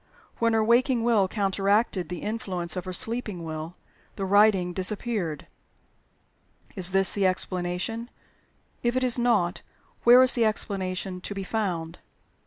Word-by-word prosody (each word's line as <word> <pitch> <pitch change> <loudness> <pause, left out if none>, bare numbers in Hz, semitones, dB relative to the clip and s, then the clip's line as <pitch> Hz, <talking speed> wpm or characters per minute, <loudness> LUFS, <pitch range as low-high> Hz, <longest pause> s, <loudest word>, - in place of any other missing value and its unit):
When 230 0 +2
her 220 -1 +3
waking 240 +1 +3
will 225 -5 +3
counteracted 195 -1 0
the 180 -2 -6
influence 185 -6 -3
of 180 - -4
her 185 - -5
sleeping 210 -2 -3
will, 160 +1 -6 0.4
the 195 - -3
writing 195 -2 +4
disappeared. 190 -4 -3 1.3
Is 185 -1 0
this 195 -1 +3
the 200 -2 +2
explanation? 185 +5 -2 0.7
If 240 +1 0
it 255 - +1
is 250 -1 0
not, 210 -7 +1 0.4
where 245 +2 +8
is 255 - +5
the 235 - +2
explanation 190 -3 -1
to 200 - -5
be 195 - -4
found? 180 -6 -3
195 Hz, 140 wpm, -26 LUFS, 180-230 Hz, 1.3 s, where